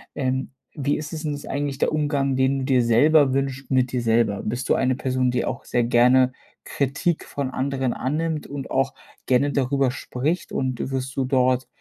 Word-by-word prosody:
Ähm, 130 Hz, -1 st, -1 dB, 0.2 s
wie 145 Hz, -1 st, 0 dB
ist 150 Hz, -1 st, -6 dB
es 155 Hz, 0 st, -5 dB
denn 150 Hz, -2 st, -2 dB
ist 145 Hz, -, -7 dB
eigentlich 140 Hz, 0 st, -3 dB
der -, -, +1 dB
Umgang, 145 Hz, -3 st, 0 dB
den 130 Hz, +1 st, +2 dB
du 130 Hz, -, -3 dB
dir 130 Hz, -2 st, +3 dB
selber 140 Hz, +4 st, +4 dB
wünscht 135 Hz, 0 st, -2 dB
mit 130 Hz, -1 st, +2 dB
dir 125 Hz, -, -1 dB
selber? 115 Hz, -3 st, +1 dB
Bist 120 Hz, +3 st, -3 dB
du -, -, +4 dB
eine 130 Hz, 0 st, +1 dB
Person, 130 Hz, -1 st, 0 dB
die 125 Hz, -1 st, 0 dB
auch -, -, -4 dB
sehr 120 Hz, -, +1 dB
gerne 125 Hz, +2 st, +4 dB, 0.3 s
Kritik 140 Hz, +5 st, -1 dB
von 140 Hz, -2 st, -4 dB
anderen 130 Hz, -1 st, -1 dB
annimmt 155 Hz, +3 st, -2 dB
und 140 Hz, -1 st, -6 dB
auch 135 Hz, 0 st, +1 dB, 0.3 s
gerne 135 Hz, +3 st, +2 dB
darüber 135 Hz, 0 st, +1 dB
spricht 140 Hz, +6 st, -3 dB
und 130 Hz, 0 st, -2 dB
wirst 130 Hz, 0 st, -3 dB
du 135 Hz, -, +1 dB
dort 130 Hz, -1 st, +2 dB
130 Hz, 195 wpm, -23 LUFS, 130-140 Hz, 0.3 s, selber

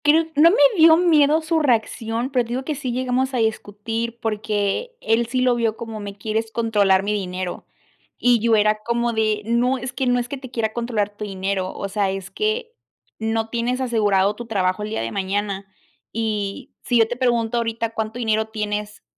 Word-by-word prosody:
Creo 310 Hz, +3 st, +5 dB
No 310 Hz, +3 st, +7 dB
me 405 Hz, -, +2 dB, 0.2 s
dio 320 Hz, 0 st, +7 dB
miedo 315 Hz, -3 st, +4 dB
su 320 Hz, 0 st, +1 dB
reacción, 235 Hz, -2 st, 0 dB
pero 250 Hz, -2 st, +2 dB
te -, -, -14 dB
digo 250 Hz, +2 st, -2 dB
que 310 Hz, -, -1 dB
sí 265 Hz, -3 st, -4 dB
llegamos 255 Hz, +1 st, 0 dB
a -, -, +1 dB
discutir, 225 Hz, +1 st, -2 dB
porque 215 Hz, -, -2 dB
él 225 Hz, -, +1 dB
sí 255 Hz, +2 st, -1 dB
lo 255 Hz, -1 st, +4 dB
vio 230 Hz, -2 st, 0 dB
como: 225 Hz, -2 st, -6 dB
"Me 200 Hz, -1 st, -7 dB
quieres 220 Hz, +2 st, -2 dB
controlar 205 Hz, -4 st, +2 dB
mi 210 Hz, +1 st, 0 dB
dinero", 185 Hz, -2 st, -4 dB, 0.5 s
y 245 Hz, -1 st, +3 dB
yo 230 Hz, +1 st, +3 dB
era 215 Hz, 0 st, +3 dB
como 235 Hz, 0 st, 0 dB
de: 215 Hz, -1 st, 0 dB
"No, 240 Hz, +3 st, +2 dB
es 255 Hz, +1 st, -6 dB
que 255 Hz, +1 st, -1 dB
no 245 Hz, 0 st, +3 dB
es 240 Hz, -, -3 dB
que 280 Hz, -, -5 dB
te 260 Hz, -1 st, -10 dB
quiera 225 Hz, -3 st, -2 dB
controlar 220 Hz, -4 st, -2 dB
tu 210 Hz, -, -6 dB
dinero, 190 Hz, -1 st, -2 dB
o 200 Hz, -, -4 dB
sea, 200 Hz, 0 st, 0 dB
es 190 Hz, -1 st, -5 dB
que 450 Hz, +3 st, -2 dB, 0.5 s
no 225 Hz, 0 st, -1 dB
tienes 240 Hz, +2 st, -1 dB
asegurado 210 Hz, -5 st, +2 dB
tu 235 Hz, +1 st, -8 dB
trabajo 190 Hz, -3 st, 0 dB
el 210 Hz, -, -3 dB
día 220 Hz, -, -2 dB
de 115 Hz, 0 st, -3 dB
mañana, 200 Hz, 0 st, -2 dB, 0.4 s
y 215 Hz, +2 st, -3 dB
si 245 Hz, -, +2 dB
yo 225 Hz, -1 st, +5 dB
te 245 Hz, -, -3 dB
pregunto 240 Hz, -2 st, +1 dB
ahorita 230 Hz, 0 st, -1 dB
cuánto 220 Hz, +1 st, -3 dB
dinero 220 Hz, -2 st, 0 dB
tienes 210 Hz, -1 st, -4 dB
225 Hz, 200 wpm, -22 LUFS, 210-250 Hz, 0.5 s, No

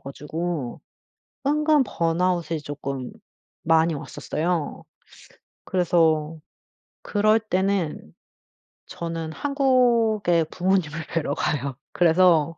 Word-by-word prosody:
가지고 150 Hz, 0 st, -5 dB, 0.7 s
은근 300 Hz, 0 st, +3 dB
번아웃이 170 Hz, -2 st, 0 dB
쪼끔 140 Hz, -3 st, -5 dB, 0.5 s
많이 165 Hz, 0 st, +3 dB
왔었어요. 160 Hz, +3 st, -3 dB, 0.8 s
그래서 165 Hz, -3 st, +2 dB, 0.7 s
그럴 215 Hz, +1 st, +2 dB
때는 190 Hz, -, -1 dB, 0.7 s
저는 165 Hz, -1 st, -5 dB
한국의 235 Hz, -, +2 dB
부모님을 175 Hz, -4 st, 0 dB
뵈러 155 Hz, -4 st, 0 dB
가요. 140 Hz, -3 st, -2 dB, 0.2 s
그래서 165 Hz, -2 st, +4 dB
170 Hz, 190 characters per minute, -24 LUFS, 155-195 Hz, 0.8 s, 그래서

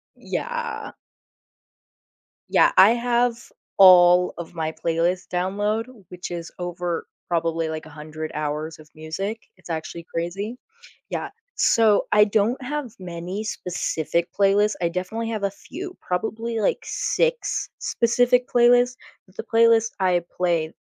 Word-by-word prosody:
Yeah. 475 Hz, -2 st, -4 dB, 1.6 s
Yeah, -, -, +5 dB
I 200 Hz, +4 st, +9 dB
have 240 Hz, 0 st, +1 dB, 0.4 s
all 180 Hz, -1 st, +7 dB
of 170 Hz, 0 st, -7 dB
my 160 Hz, -1 st, -2 dB
playlists 170 Hz, +2 st, -1 dB
download, 205 Hz, +5 st, -1 dB, 0.2 s
which 180 Hz, 0 st, -7 dB
is 170 Hz, -1 st, -6 dB
over, 175 Hz, -1 st, -3 dB, 0.2 s
probably, 165 Hz, -1 st, 0 dB
like, 155 Hz, 0 st, -5 dB
100 155 Hz, +1 st, -7 dB
hours 155 Hz, +1 st, -3 dB
of 155 Hz, -, -16 dB
music, 195 Hz, +8 st, -4 dB, 0.2 s
it's 180 Hz, -, -16 dB
actually 165 Hz, +1 st, -5 dB
crazy. 195 Hz, +8 st, -3 dB, 0.5 s
Yeah, -, -, -3 dB, 0.3 s
so, 220 Hz, -3 st, +3 dB
I 210 Hz, 0 st, +6 dB
don't 220 Hz, +5 st, +1 dB
have 275 Hz, -4 st, -4 dB
many 180 Hz, +3 st, -5 dB
specific 170 Hz, -3 st, -2 dB
playlists, 205 Hz, +1 st, +3 dB
I 170 Hz, -, +2 dB
definitely 200 Hz, +6 st, -3 dB
have 215 Hz, -3 st, -3 dB
a 200 Hz, -, +1 dB
few, 360 Hz, -, -9 dB
probably, 220 Hz, +5 st, -2 dB
like, 210 Hz, -, +1 dB
6 485 Hz, 0 st, -1 dB
specific 245 Hz, +1 st, +2 dB
playlists, 245 Hz, +1 st, +4 dB, 0.3 s
but 185 Hz, -, -23 dB
the -, -, -4 dB
playlist 230 Hz, -1 st, +4 dB
I 180 Hz, -2 st, +2 dB
play 170 Hz, -3 st, 0 dB
190 Hz, 125 wpm, -23 LUFS, 170-230 Hz, 1.6 s, I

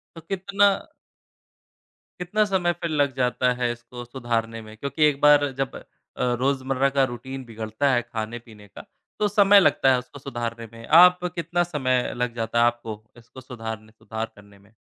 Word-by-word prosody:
तो 165 Hz, -, -10 dB
कितना 195 Hz, +3 st, 0 dB, 1.5 s
कितना 195 Hz, +5 st, +1 dB
समय 190 Hz, -3 st, +1 dB
फ़िर 170 Hz, -1 st, -5 dB
लग 145 Hz, -3 st, +1 dB
जाता 125 Hz, -1 st, +1 dB
है 120 Hz, -1 st, +1 dB
इसको 120 Hz, +1 st, -9 dB
सुधारने 115 Hz, -2 st, -3 dB
में? 110 Hz, 0 st, -12 dB
क्योंकि 140 Hz, +5 st, -2 dB
एक 145 Hz, -2 st, +2 dB
बार 145 Hz, -1 st, +6 dB
जब 135 Hz, -2 st, -2 dB
अ, -, -, -9 dB, 0.6 s
रोज़मर्रा 135 Hz, 0 st, +1 dB
का 135 Hz, -, +5 dB
रूटीन 130 Hz, +2 st, -7 dB
बिगड़ता 115 Hz, +4 st, -2 dB
है 120 Hz, -, +2 dB
खाने-पीने 115 Hz, -2 st, -8 dB
का -, -, -13 dB, 0.3 s
तो 210 Hz, -, +2 dB
समय 205 Hz, -1 st, +6 dB
लगता 135 Hz, -7 st, +3 dB
है 125 Hz, -, +3 dB
उसको 135 Hz, +3 st, -12 dB
सुधारने 120 Hz, -3 st, -5 dB
में। 115 Hz, 0 st, -11 dB
आप 180 Hz, 0 st, +6 dB
कितना 170 Hz, +1 st, 0 dB
समय 130 Hz, -7 st, -1 dB
लग 125 Hz, -1 st, -2 dB
जाता 115 Hz, 0 st, -1 dB
है 120 Hz, -, +5 dB
आपको 120 Hz, -3 st, -2 dB, 0.2 s
इसको 120 Hz, +2 st, -14 dB
सुधारने 110 Hz, -3 st, -8 dB
सुधार 110 Hz, 0 st, -6 dB
करने 100 Hz, -1 st, -18 dB
में? 100 Hz, +1 st, -24 dB
125 Hz, 170 wpm, -24 LUFS, 115-150 Hz, 1.5 s, बार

